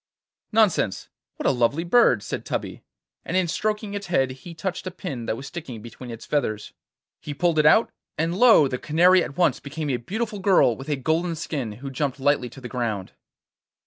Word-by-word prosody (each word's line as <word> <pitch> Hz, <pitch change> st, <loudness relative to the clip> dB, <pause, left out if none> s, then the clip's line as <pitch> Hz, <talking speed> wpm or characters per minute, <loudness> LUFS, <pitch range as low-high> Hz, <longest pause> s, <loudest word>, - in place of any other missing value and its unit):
'Nonsense! 205 Hz, -, +2 dB, 0.3 s
What -, -, -7 dB
a -, -, +5 dB
lovely 130 Hz, +5 st, +1 dB
bird!' 170 Hz, -, +4 dB
said -, -, -4 dB
Tubby, -, -, -4 dB, 0.4 s
and 180 Hz, -, -1 dB
in 185 Hz, -2 st, +2 dB
stroking 210 Hz, +3 st, -2 dB
its 200 Hz, -2 st, -5 dB
head 135 Hz, -7 st, +1 dB
he 165 Hz, +6 st, -10 dB
touched 180 Hz, +2 st, -4 dB
a -, -, -1 dB
pin 150 Hz, -10 st, -6 dB
that 110 Hz, -, -1 dB
was 135 Hz, -, -8 dB
sticking 140 Hz, -8 st, -7 dB
between 120 Hz, +2 st, -10 dB
its 115 Hz, -1 st, -8 dB
feathers. 110 Hz, -8 st, -2 dB, 0.5 s
He 145 Hz, -, -7 dB
pulled 170 Hz, 0 st, +1 dB
it 150 Hz, -, +5 dB
out, 220 Hz, +8 st, +5 dB, 0.3 s
and 165 Hz, +2 st, 0 dB
lo! 220 Hz, -, +6 dB
the 125 Hz, -1 st, -4 dB
Canary 175 Hz, +4 st, +4 dB
at 140 Hz, -, -7 dB
once 180 Hz, -, +2 dB
became 145 Hz, +1 st, -4 dB
a 125 Hz, -, 0 dB
beautiful 210 Hz, -, -4 dB
girl 190 Hz, -, +4 dB
with 135 Hz, +5 st, -9 dB
a 145 Hz, -, +1 dB
golden 160 Hz, +5 st, 0 dB
skin 140 Hz, -8 st, -4 dB
who 135 Hz, +5 st, -8 dB
jumped 140 Hz, 0 st, -2 dB
lightly 135 Hz, -2 st, +1 dB
to 135 Hz, -, -12 dB
the 125 Hz, -, -6 dB
ground. 115 Hz, -7 st, -3 dB
150 Hz, 200 wpm, -24 LUFS, 125-180 Hz, 0.5 s, lo